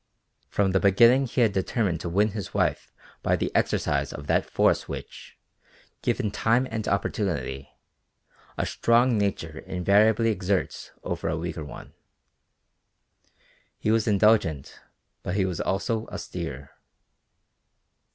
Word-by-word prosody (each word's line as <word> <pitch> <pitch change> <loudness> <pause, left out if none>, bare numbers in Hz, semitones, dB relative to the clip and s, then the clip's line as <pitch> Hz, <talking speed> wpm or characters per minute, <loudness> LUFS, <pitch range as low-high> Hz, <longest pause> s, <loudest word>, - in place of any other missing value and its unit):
From 100 -2 +1
the 95 - +3
beginning 120 +8 +5
he 125 - -1
had 115 -3 +4
determined 95 -2 0
to 85 - -4
win 100 +5 +2
his 105 -2 -6
wife - - 0 0.3
by - - +2
the - - -3
exercise - - +1
of 70 - -8
that - - +1
force - - +2
which, - - -8 0.6
given 105 - 0
time 120 +5 +2
and 110 -2 -3
opportunity, 85 -9 -2 0.9
a - - 0
strong 120 +1 +3
nature 95 -6 -2
invariably 105 +5 +2
exerts 95 -1 -2
over - - -3
a 80 - -1
weaker 80 -1 -4
one. 75 - -10 1.8
He 110 - 0
was 115 0 +2
indulgent 100 -8 +2 0.4
but 90 - -3
he 100 -2 +2
was 90 -4 -3
also 110 +3 -1
austere. 70 +2 -6
100 Hz, 125 wpm, -26 LUFS, 90-110 Hz, 1.8 s, beginning